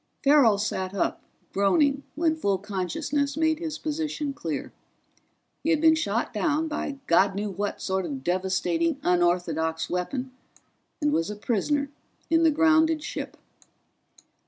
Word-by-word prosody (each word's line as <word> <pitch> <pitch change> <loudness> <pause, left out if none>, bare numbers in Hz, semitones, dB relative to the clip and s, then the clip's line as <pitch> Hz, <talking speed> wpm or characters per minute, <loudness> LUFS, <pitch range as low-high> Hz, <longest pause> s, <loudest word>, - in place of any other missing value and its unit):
Farrell 275 -7 +5
sat 195 -2 -2
up, 195 - -1 0.3
groaning, 275 - +3
when 320 0 +1
full 200 -11 0
consciousness 280 - -2
made 315 0 +2
his 315 -3 -4
position 300 -2 -3
clear. 160 - -5 0.9
He - - 0
had 320 -2 +3
been 320 0 +6
shot 230 -7 -1
down 300 +8 0
by 295 -2 -3
God 190 +3 +3
knew 205 0 -2
what 200 +2 -3
sort 190 -1 -1
of 135 -4 -6
devastating 190 - 0
unorthodox 175 -2 +1
weapon 250 +9 -2 0.7
and 295 - +2
was 165 +3 0
a 210 - -4
prisoner 275 +7 -1 0.4
in 325 0 +4
the 325 - +5
grounded 320 0 +3
ship. - - -6
265 Hz, 135 wpm, -26 LUFS, 190-310 Hz, 0.9 s, been